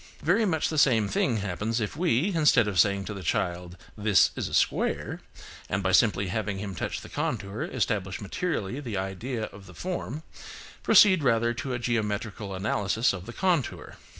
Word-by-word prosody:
Very 200 +8 +3
much 160 -6 0
the 155 - 0
same 115 -7 +4
thing 110 +4 +1
happens 105 +3 -2
if 105 -3 -3
we, 170 - +1
instead 150 -9 +4
of 95 -4 0
saying 100 +1 +3
to 105 - -5
the 100 - -7
child, 90 +1 -2 0.2
"This 105 -2 +4
is - - -3
a - - -8
square," - - 0 0.5
and 100 +1 -1
by 95 - +1
simply 100 -1 +3
having 105 0 -2
him 100 0 -5
touch 85 - -4
the - - -10
contour 100 +6 -3
establish 100 - -2
materially 110 - -3
the 120 -8 -4
idea 105 +6 -3
of 100 -2 -9
the 90 - -13
form, 160 -5 -4 0.6
proceed 190 -5 +6
rather 120 -3 +2
to 130 +1 -4
a - - -1
geometrical 110 -3 -2
analysis 105 +4 +1
of 90 0 -7
the 120 - -7
contour. 175 -6 -1
110 Hz, 180 wpm, -27 LUFS, 100-135 Hz, 0.6 s, proceed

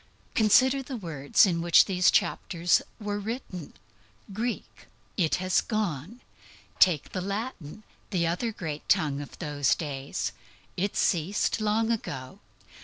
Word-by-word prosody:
Consider 255 +5 +4
the 265 -1 -6
words 160 -7 +2
in 170 -3 0
which 170 0 +6
these 180 -3 +3
chapters 175 0 +2 0.2
were 205 -1 -3
written 205 - -6 0.6
Greek. 230 +4 -4 0.3
It 165 -6 +2
has 185 0 +1
gone. 210 - -3 0.6
Take 170 -6 +4
the 185 - -3
Latin 200 - -5 0.3
the 180 -5 0
other 180 +8 -1
great 155 -7 -6
tongue 145 -2 +2
of 145 - -10
those 145 -4 +1
days. 140 -3 -4 0.4
It 200 +3 -2
ceased 185 +6 +1
long 220 +2 +1
ago. 130 - -4
185 Hz, 125 wpm, -27 LUFS, 155-215 Hz, 0.6 s, which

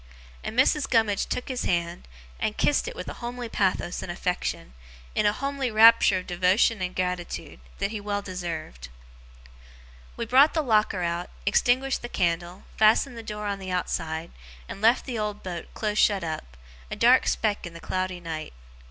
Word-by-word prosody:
And 225 - -5
Mrs. 275 +2 +3
Gummidge 220 -4 +2
took 250 - -3
his 255 -2 -3
hand, 170 0 -1 0.3
and 215 - -2
kissed 295 - +2
it - - -6
with - - -7
a - - -5
homely 240 0 -5
pathos 190 -4 -1
and - - -5
affection, 180 - -3 0.4
in 210 - +2
a - - +4
homely 275 +2 -2
rapture 220 -3 +6
of 185 - -5
devotion 185 +5 +2
and 180 0 -3
gratitude, 180 - -3 0.2
that 200 - -1
he 215 -2 -4
well 205 0 -2
deserved. 165 - -6 1.3
We 235 - -2
brought 270 +7 +5
the 315 - +2
locker 215 -6 +2
out, 170 +1 -2 0.2
extinguished 250 +6 +2
the 240 - -6
candle, 175 0 -1
fastened 220 +4 +4
the 230 - -7
door 210 -1 -6
on 200 -1 -2
the 190 -1 -7
outside, 165 -2 -2 0.4
and 195 - -8
left 230 +3 +4
the 245 -4 -4
old 210 -1 -3
boat 175 -3 -6
close 210 -1 -1
shut 200 -4 +3
up, 155 - -6 0.3
a - - -4
dark 250 +2 +5
speck 210 -5 0
in 170 - -11
the - - -8
cloudy 185 +1 -3
night. 160 - -6
205 Hz, 180 wpm, -26 LUFS, 175-230 Hz, 1.3 s, rapture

